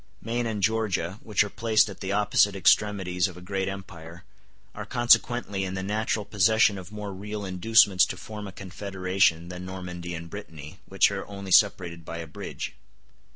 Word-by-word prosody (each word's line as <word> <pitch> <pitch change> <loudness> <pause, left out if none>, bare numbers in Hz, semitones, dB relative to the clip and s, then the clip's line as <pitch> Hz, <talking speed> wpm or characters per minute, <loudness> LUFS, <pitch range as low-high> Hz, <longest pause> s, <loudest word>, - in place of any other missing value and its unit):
Maine 115 +1 -2
and 105 -3 -3
Georgia, 105 -4 0
which 105 -2 +2
are 105 - -5
placed 110 -2 +3
at 100 - -9
the 95 - -4
opposite 105 0 +3
extremities 95 -1 +2
of 90 -2 -10
a - - -9
great 95 +1 -3
empire, 90 -3 -8 0.5
are - - -6
consequently 120 -4 +2
in 95 0 -4
the 95 - -3
natural 105 +1 -1
possession 105 0 +3
of 90 +1 -11
more 105 -2 -6
real 105 +2 -6
inducements 95 +1 +4
to - - -6
form 105 -1 -8
a - - -8
confederation 95 -3 -1
than 90 0 -7
Normandy 90 -2 -6
and 85 0 -7
Brittany, 80 -3 -10
which 95 +1 +3
are 95 -1 -5
only 100 -1 -8
separated 90 -4 +3
by 85 +1 -7
a 85 - -5
bridge. 75 - -7
95 Hz, 175 wpm, -26 LUFS, 90-105 Hz, 0.5 s, inducements